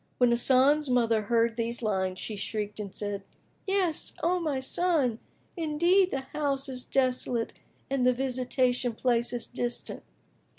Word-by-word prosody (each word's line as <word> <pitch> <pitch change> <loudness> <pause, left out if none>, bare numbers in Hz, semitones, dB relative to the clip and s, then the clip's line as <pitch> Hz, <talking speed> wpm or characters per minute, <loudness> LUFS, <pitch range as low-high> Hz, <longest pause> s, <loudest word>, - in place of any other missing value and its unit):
"[FN#23] - - -40
When 245 -1 +4
Hasan's 265 +4 +4
mother 230 -3 +2
heard 230 +2 +1
these 235 +1 -2
lines, 190 -3 -1
she 215 - -5
shrieked 210 +1 -4
and 200 -2 -6
said, 205 -1 -3 0.5
"Yes, 380 -5 +1
O 360 +2 +2
my 300 -6 -1
son! 270 -4 +1 0.4
Indeed, 345 +3 +2
the 270 - -2
house 280 0 -2
is 255 -2 -4
desolate 250 -3 0 0.3
and 270 -2 0
the 250 - +5
visitation 250 -1 0
place 240 0 +1
is 245 -1 -3
distant!" 240 -1 -4
250 Hz, 145 wpm, -28 LUFS, 230-285 Hz, 0.5 s, the